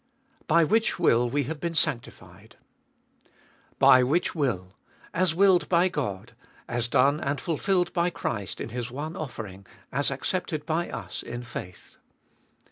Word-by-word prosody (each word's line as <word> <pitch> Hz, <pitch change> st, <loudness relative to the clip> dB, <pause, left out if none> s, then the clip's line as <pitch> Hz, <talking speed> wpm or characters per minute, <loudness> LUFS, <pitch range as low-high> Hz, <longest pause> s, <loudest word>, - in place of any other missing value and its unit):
By 170 Hz, +1 st, +5 dB
which 220 Hz, +7 st, +2 dB
will 120 Hz, -8 st, +3 dB
we 145 Hz, +3 st, 0 dB
have 150 Hz, +4 st, -5 dB
been 170 Hz, +2 st, -3 dB
sanctified. 120 Hz, -6 st, -3 dB, 1.2 s
By 130 Hz, -, +7 dB
which 150 Hz, +8 st, +1 dB
will, 105 Hz, -, -2 dB, 0.4 s
as 170 Hz, -2 st, +2 dB
willed 190 Hz, -1 st, +4 dB
by 180 Hz, +1 st, +4 dB
God, 115 Hz, -, -4 dB, 0.3 s
as 120 Hz, 0 st, -1 dB
done 140 Hz, +5 st, +3 dB
and 140 Hz, -1 st, -2 dB
fulfilled 175 Hz, +3 st, 0 dB
by 175 Hz, 0 st, +2 dB
Christ 100 Hz, -, -4 dB
in -, -, -5 dB
His 120 Hz, +1 st, -4 dB
one 150 Hz, +6 st, -5 dB
offering, 110 Hz, -, -7 dB, 0.3 s
as 140 Hz, +2 st, +1 dB
accepted 150 Hz, +2 st, -2 dB
by 165 Hz, +2 st, -1 dB
us 95 Hz, -4 st, -5 dB
in 120 Hz, +1 st, -6 dB
faith. 90 Hz, -7 st, -9 dB
145 Hz, 140 wpm, -26 LUFS, 120-170 Hz, 1.2 s, By